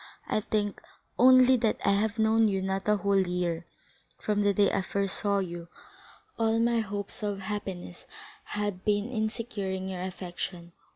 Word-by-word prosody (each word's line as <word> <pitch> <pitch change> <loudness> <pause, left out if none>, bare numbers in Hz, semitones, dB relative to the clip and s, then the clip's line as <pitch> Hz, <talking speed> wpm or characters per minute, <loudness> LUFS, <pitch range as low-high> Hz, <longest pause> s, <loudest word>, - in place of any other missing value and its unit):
I - - +1
think 205 -1 -2 0.4
only 255 0 +7
that 225 -2 +1
I - - +5
have 210 +2 +1
known 220 0 +4
you 195 -2 0
not 190 +1 -2
a 210 - +4
whole 200 -1 +2
year. 175 -2 -1 0.5
From 210 -1 0
the 205 0 +4
day 200 0 +3
I 195 - +1
first 195 +1 -1
saw 200 -1 +1
you, 175 -3 -4 0.7
all 225 0 +2
my 235 0 +2
hopes 205 +1 -4
of 205 -2 -2
happiness 190 -3 -5 0.4
have 205 -3 -3
been 210 +3 +1
in 220 -3 0
securing 195 -5 -4
your 185 -1 -4
affection. 175 -1 -5
200 Hz, 165 wpm, -28 LUFS, 190-220 Hz, 0.7 s, only